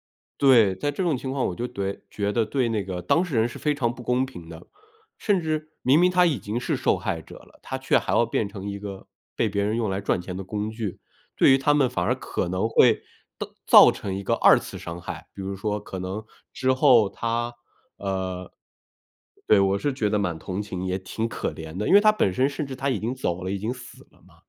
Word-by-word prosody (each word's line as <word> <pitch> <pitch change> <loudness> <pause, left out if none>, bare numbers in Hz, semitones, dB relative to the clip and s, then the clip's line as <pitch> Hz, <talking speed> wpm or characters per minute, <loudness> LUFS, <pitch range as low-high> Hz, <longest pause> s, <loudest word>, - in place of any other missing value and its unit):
觉 - - - 0.2
得 140 - +2
对， 110 -7 +6
在 145 +10 -2
这 145 - -4
种 160 -7 +1
情 130 +1 -5
况 135 -2 -1
我 90 - -4
觉 120 - -3
得 - - -8
怼 100 0 -3
觉 100 0 -2
得 115 -2 +2
对 125 +1 0
那 110 -3 -1
个 90 -2 -5
当 170 - +2
事 160 -9 -4
人 110 - +3
是 120 - -9
非 150 -1 0
常 120 -4 -1
不 125 - -10
公 125 +2 +1
平 90 -11 -11
的， 80 0 -11 0.5
甚 200 -4 +1
至 155 -1 -2
明 135 +5 +4
明 180 +1 +4
他 180 0 +4
已 155 -8 +2
经 105 +5 -4
是 - - -1
受 - - +1
害 - - -3
者 - - -13
了， - - -19
他 - - -4
却 - - +2
还 - - -2
要 - - +4
变 100 - -1
成 100 -1 -6
一 100 - -4
个 100 -1 -8 0.3
被 115 - +1
别 100 -1 -1
人 105 +3 0
用 115 -3 0
来 95 +1 -2
赚 90 -2 0
钱 90 0 -7
的 95 - -5
工 105 +2 -3
具， 110 -3 -5 0.4
对 - - +6
于 135 - +6
他 145 +2 +2
们 140 -4 +3
反 95 -8 -2
而 - - +2
可 - - -3
能 95 +5 0
会 115 0 +4 0.4
到 - - -3 0.2
造 - - +9
成 95 - -5
一 100 - -5
个 - - 0
2 - - +6
次 - - -8
伤 85 +1 -7
害， - - -7
比 100 - -8
如 95 +1 -4
说 105 +2 -2
可 95 -2 -7
能 95 +4 -5 0.3
之 130 0 +1
后 130 -6 +5
他 115 +3 -2 0.4
呃， 95 -2 -4 1.0
对， 105 - +6
我 95 0 +2
是 145 +2 -1
觉 110 -6 0
得 105 - +1
蛮 90 -5 -1
同 95 +4 -4
情， 95 -3 -5
也 95 +1 -1
挺 110 +4 -3
可 - - -3
怜 80 +1 -8
的。 105 - -2
因 - - +3
为 205 - +8
他 215 - +6
本 155 - +1
身 130 +7 +2
甚 145 +1 -4
至 135 - -6
他 135 +2 -1
已 125 -6 0
经 120 +4 -3
走 90 -8 -2
了、 95 - -3
已 100 - -1
经 110 +5 -2
死 125 -1 -13
了 - - -26
嘛， - - -21
110 Hz, 275 characters per minute, -25 LUFS, 95-130 Hz, 1.0 s, 造